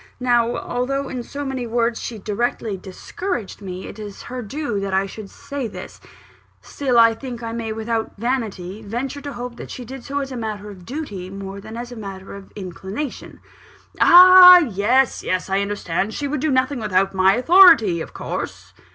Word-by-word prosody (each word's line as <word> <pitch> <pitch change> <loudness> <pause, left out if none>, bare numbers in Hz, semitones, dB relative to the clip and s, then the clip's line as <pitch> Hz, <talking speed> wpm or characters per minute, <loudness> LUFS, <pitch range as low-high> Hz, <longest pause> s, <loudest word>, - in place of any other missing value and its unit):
"Now, 240 -1 +2
although 270 +3 -2
in 250 - -4
so 285 +4 -6
many 260 -3 -4
words 235 0 0
she 230 - -5
directly 215 +1 -2
discouraged 205 - -6
me 185 -1 -7
it 210 - -10
is 205 -2 -8
her 250 +1 -6
due 240 -1 -3
that 195 -1 -2
I 190 +1 +2
should 200 +1 -9
say 280 -1 -6
this 210 - -10 0.6
still, 260 -4 -2
I 230 -1 +6
think 240 0 -8
I 230 - -4
may 230 -1 -4
without 225 0 -3
vanity 215 -5 -3
venture 245 +7 -5
to 285 0 -6
hope 245 0 -7
that - - -9
she 250 - -8
did 260 +1 -9
so 280 0 -4
as 275 -1 -3
a - - -5
matter 210 -3 -5
of 180 -3 -14
duty, 210 - -6
more 195 0 -8
than 220 +3 -9
as 240 +1 -7
a - - -8
matter 195 -3 -8
of 200 -1 -11
inclination." 195 - -7 0.6
"Ah 360 0 +10
yes, 245 - +1
yes! 185 +1 -2
I 195 - +2
understand. 200 0 -2
She 290 - -3
would 285 -1 -3
do 310 - +1
nothing 260 0 +1
without 195 -3 +1
my 190 +1 +4
authority, 255 - +6
of - - -7
course?" - - -6
230 Hz, 185 wpm, -21 LUFS, 200-265 Hz, 0.6 s, Ah